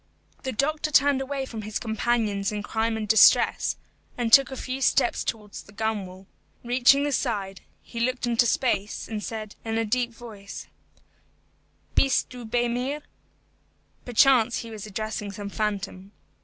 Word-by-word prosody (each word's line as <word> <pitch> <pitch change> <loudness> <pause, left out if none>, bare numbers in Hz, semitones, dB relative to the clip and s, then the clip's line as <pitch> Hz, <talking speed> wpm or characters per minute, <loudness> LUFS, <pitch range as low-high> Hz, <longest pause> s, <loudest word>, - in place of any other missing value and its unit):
The 260 - -3
doctor 305 +5 0
turned 285 -2 +4
away 270 0 -3
from 225 -4 -7
his 215 0 -4
companions 220 -3 0
in 210 -1 -4
crime 225 +1 -1
and 215 -1 -4
distress, 220 +1 +5 0.4
and 235 -2 -1
took 275 -1 +8
a 265 - -7
few 260 +2 -4
steps 250 -1 +2
towards 210 -3 -5
the - - -17
gunwale. 200 -3 -4 0.4
Reaching 250 +3 +4
the 290 - 0
side, 205 -8 -2 0.2
he 235 - -8
looked 255 +1 0
into 240 0 +3
space, 210 -5 -1
and 215 -2 -5
said, 215 -2 -6
in 225 0 -2
a 225 - +1
deep 240 +2 0
voice, 220 -4 -10 1.3
"Bist 270 -1 +2
du 250 -2 -8
bei 240 +2 0
mir?" 260 +5 -2 1.0
Perchance 245 -1 +4
he 230 - -9
was 215 -1 -7
addressing 210 0 -4
some 200 +1 -6
phantom. 200 -2 -3
225 Hz, 155 wpm, -25 LUFS, 210-255 Hz, 1.3 s, took